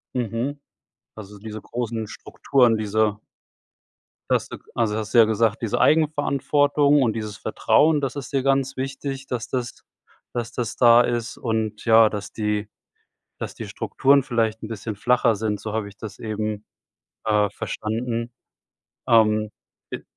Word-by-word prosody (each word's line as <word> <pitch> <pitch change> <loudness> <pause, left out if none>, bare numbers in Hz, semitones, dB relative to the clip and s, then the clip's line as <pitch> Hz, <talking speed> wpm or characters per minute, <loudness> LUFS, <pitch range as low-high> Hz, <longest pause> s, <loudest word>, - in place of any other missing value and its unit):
Mhm, 125 +4 -2 0.6
also 105 -1 -11
diese 110 +1 -7
großen 115 -2 -4
Strukturen, 120 -5 +1
diese 105 0 0 1.1
dass - - +2
du - - -8 0.2
also 110 -3 +1
hast 110 0 -5
du - - +4
ja 115 - +9
gesagt, 110 0 +1
diese 115 - -1
Eigenverantwortung 145 -1 +3
und 115 -4 +2
dieses 110 -2 -5
Vertrauen, 150 +7 +2
das 135 -3 -2
ist 140 0 -6
dir 135 -2 0
ganz 135 0 +1
wichtig, 135 +1 -4
dass 120 -2 -4
das 125 -3 -4 0.5
dass 120 -1 -3
das 120 -4 -3
da 120 -1 +7
ist 120 -1 -2
und 110 -2 -2
ja, 110 -1 +6
dass 105 -1 -6
die 105 -1 -2 0.7
dass - - -5
die - - -7
Strukturen 140 +1 +2
vielleicht 115 -4 -1
'n 110 - -4
bisschen 110 -1 -5
flacher 120 +1 +2
sind, 105 -1 -2
so 110 -1 -6
habe 110 -2 -2
ich 100 - -18
das 110 - -9
eben, 110 -1 -4 0.6
äh, 105 -2 +2
verstanden. 115 +2 -3 0.8
Ähm, 110 -2 +3 0.4
i - - -6
115 Hz, 150 wpm, -23 LUFS, 110-130 Hz, 1.1 s, ja